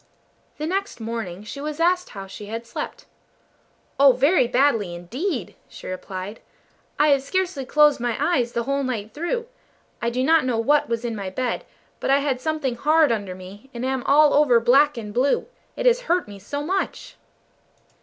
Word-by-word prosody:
The 305 - -3
next 390 -2 -2
morning 220 -5 -5
she 280 +6 -7
was 300 +1 -5
asked 360 +2 +2
how 195 -1 -8
she 205 +2 -10
had 225 +2 -5
slept. - - -6 0.9
"Oh, 275 -1 +8
very 275 +2 +3
badly 235 -8 +2
indeed!" 240 - -4 0.2
she - - -12
replied. 185 +3 -6 0.6
"I 300 +1 +4
have 280 -2 +4
scarcely 355 -1 -2
closed 300 +1 +4
my 240 -1 -1
eyes 250 -9 +1
the 235 - -1
whole 275 +3 -1
night 225 -5 -3
through. 345 +10 -2 0.6
I 235 - +1
do 250 +2 -1
not 320 +2 +4
know 250 -3 0
what 285 +6 +2
was 230 0 -2
in 230 -2 -2
my 200 -2 -4
bed, 245 +5 -2 0.3
but - - -3
I 275 - +5
had 275 -3 -1
something 295 -5 -2
hard 305 +1 +4
under 200 -5 -2
me, 195 +7 -12
and 235 +2 -3
am 265 -1 -1
all 295 +1 +6
over 280 -5 +5
black 275 +4 +4
and 210 -3 -6
blue. 265 +4 +2 0.3
It - - -4
has - - +4
hurt 355 - 0
me 200 -1 -10
so 285 +9 -5
much!" 380 +5 -3
260 Hz, 185 wpm, -23 LUFS, 225-300 Hz, 0.9 s, Oh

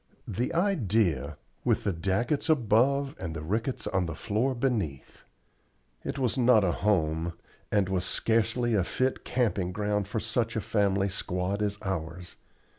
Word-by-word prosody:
The 115 - -1
idea! 105 - +1 0.3
with - - +2
the 100 - 0
Daggetts 100 - 0
above 135 +1 +3
and 80 -3 -4
the 75 - -5
Ricketts 115 - -2
on 95 -2 0
the 80 - -4
floor 115 +8 0
beneath. 110 - -2 0.8
It - - -4
was 130 -1 0
not 120 -4 +5
a 90 - +2
home, 85 -4 0 0.4
and 100 -3 +3
was 95 -1 0
scarcely 115 +4 +1
a 100 -4 +3
fit 130 +8 -1
camping 105 -7 0
ground 105 0 -1
for 110 +2 -2
such 115 +1 -1
a 110 - 0
family 100 -2 +1
squad 90 +2 -2
as 100 -1 0
ours. 90 -2 -4
105 Hz, 150 wpm, -28 LUFS, 90-120 Hz, 0.8 s, not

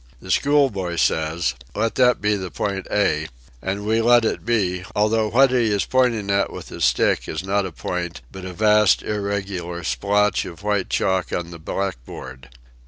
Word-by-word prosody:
The 95 - -6
schoolboy 130 -11 +2
says 80 0 +1
:* - - -28
" - - -28
Let 115 +2 0
that 125 -1 +3
be 105 0 +2
the 95 -2 -4
point 95 +3 -3
A," 90 -7 +1 0.3
and 100 +2 -3
we 110 +2 +2
let 120 0 +5
it - - -1
be 95 -6 0
although 110 +1 +2
what 135 +4 +4
he 120 -4 +2
is 100 -1 +1
pointing 120 -6 +1
at 100 0 +1
with - - -9
his - - -1
stick - - +2
is 80 +3 -3
not 100 0 0
a - - -8
point 85 -2 -4
but 95 - -9
a 95 - -5
vast 105 +2 +4
irregular 100 -4 -3
splotch 105 +4 +1
of 85 +3 -10
white 105 -3 0
chalk 95 -1 0
on 85 -1 -3
the 85 - -9
black 95 -4 -3
board. 65 +1 -10
100 Hz, 190 wpm, -22 LUFS, 90-110 Hz, 0.3 s, let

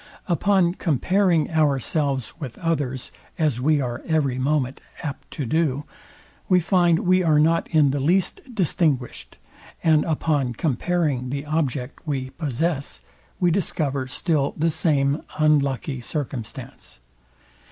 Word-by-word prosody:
Upon 185 -1 +2
comparing 175 +1 +1
ourselves 140 -3 0
with 135 -7 -7
others, 145 -7 -2 0.3
as 150 -7 +1
we 150 +2 +3
are 120 -3 -3
every 145 -6 +1
moment 135 -1 0 0.2
apt 145 -4 -6
to 145 - -3
do, 150 0 0 0.7
we 185 -1 +5
find 175 -1 +3
we 185 +1 +4
are 155 -4 +3
not 165 +2 +3
in 150 -4 +4
the 140 - -1
least 175 +7 +1
distinguished; 160 - -1 0.5
and 155 -2 +4
upon 150 -5 0
comparing 145 -1 0
the 140 +2 -4
object 145 -4 -2
we 130 -3 -2
possess, 140 - -2 0.4
we 175 -1 +3
discover 145 -7 -1
still 145 +1 0
the 165 +2 +2
same 145 -2 +1 0.2
unlucky 140 -3 +1
circumstance. 120 - -6
150 Hz, 120 wpm, -23 LUFS, 135-165 Hz, 0.7 s, we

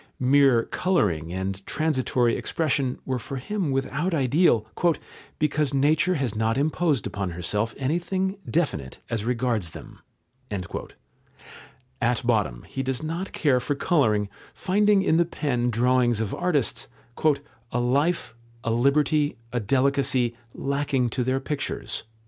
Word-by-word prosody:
Mere 130 -2 +5
colouring 95 - 0
and 95 +1 -3
transitory 130 -6 +1
expression 140 -5 0
were 130 -1 -1
for 135 - -7
him 180 +6 -2
without 140 +6 -1
ideal, 135 - +3 0.7
"because 150 -2 +1
nature 155 +6 +3
has 130 -8 -1
not 110 +2 0
imposed 150 -1 +1
upon 100 -2 -3
herself 105 +6 -1
anything 180 +7 -1
definite 80 - -1
as 110 -2 -1
regards 120 -6 0
them." - - -13 2.0
At 120 0 +1
bottom 105 - +1
he 135 - -5
does 130 +1 -2
not 165 +5 -3
care 140 -5 +2
for 145 +3 -2
colouring, 110 -10 +2 0.3
finding 205 +1 +3
in 160 - +3
the 170 - +5
pen 125 -7 -1
drawings 120 0 +2
of 110 -3 -2
artists 170 -8 0 0.8
"a 120 - 0
life, 140 +8 +1 0.3
a 115 - 0
liberty, 145 +5 +2 0.2
a 120 - +1
delicacy, 130 0 +1 0.2
lacking 140 -3 0
to 125 - -1
their 130 +2 0
pictures." 140 -3 -4
130 Hz, 125 wpm, -25 LUFS, 115-150 Hz, 2.0 s, Mere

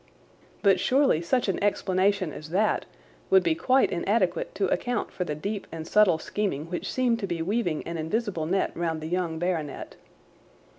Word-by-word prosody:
But 195 -2 +5
surely 265 - +3
such 245 +8 0
an 195 - -1
explanation 195 -3 +1
as 155 - -9
that 205 +5 +1 0.4
would 380 -1 +6
be 340 - +2
quite 270 -5 +2
inadequate 185 0 0
to 200 - +1
account 245 -3 -1
for 180 - -3
the 150 - -3
deep 200 +6 -4
and 160 -1 -6
subtle 200 -3 +4
scheming 165 -3 -3
which 175 - -3
seemed 245 -3 +1
to 200 - -3
be 170 -2 -2
weaving 185 -4 -1
an 170 0 -4
invisible 170 -1 -2
net 190 +3 0
round 165 -2 -2
the 155 - -5
young 175 -1 -1
baronet. 160 -4 -3
185 Hz, 170 wpm, -26 LUFS, 165-215 Hz, 0.4 s, would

